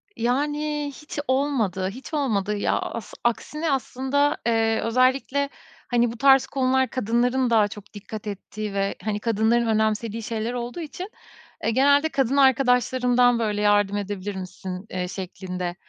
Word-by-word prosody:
Yani, 295 +4 -1
hiç 300 -1 -7
olmadı, 250 -9 0
hiç 255 +9 -10
olmadı, 210 -9 0
ya, 205 - +1
as 230 - -6
aksine, 300 +6 -1
aslında, 275 +2 0
eee, 225 -1 +2
özellikle, 260 +4 +1 0.4
hani, 240 -1 +2
bu 235 - -9
tarz 270 +1 +6
konular 260 -1 +1
kadınların 245 +1 +1
daha 220 -3 +4
çok 205 0 -12
dikkat 210 +1 -8
ettiği 205 +1 -5
ve, 195 0 -1
hani, 210 0 -1
kadınların 230 +2 +2
önemsediği 220 0 0
şeyler 225 +2 -3
olduğu 245 +5 -4
için, 355 +5 -7 0.5
eee, - - +1
genelde 285 +5 +4
kadın 275 -1 +1
arkadaşlarımdan 250 -2 +4
böyle, 210 -2 -1
"Yardım 205 -1 +3
edebilir 205 0 -4
misin?" 185 0 -6
eee, 180 -1 -3
şeklinde 180 -1 -5
235 Hz, 140 wpm, -24 LUFS, 205-265 Hz, 0.5 s, tarz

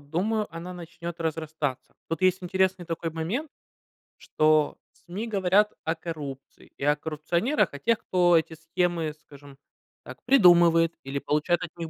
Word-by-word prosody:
думаю, 195 +9 -1
она 175 +2 -6
начнет 170 0 -8
разрастаться. 155 -4 -3
Тут 165 +1 -3
есть 185 0 +3
интересный 190 0 0
такой 165 -1 -3
момент, 190 - -3 0.7
что 155 -1 +2 0.2
СМИ 195 +6 -7
говорят 205 0 +2
о 160 +1 -1
коррупции 150 -5 -8
и - - -7
о 145 +1 +4
коррупционерах, 160 - 0
о 145 - -7
тех, 230 -1 +1
кто 175 -2 +3
эти 160 0 -1
схемы, 165 0 -1
скажем 140 -2 -15 0.5
так, - - -11
придумывает 170 -8 +5
или 135 +1 -3
получает 155 +5 0
от 160 - -8
них 165 -1 -5
165 Hz, 145 wpm, -26 LUFS, 155-180 Hz, 0.7 s, придумывает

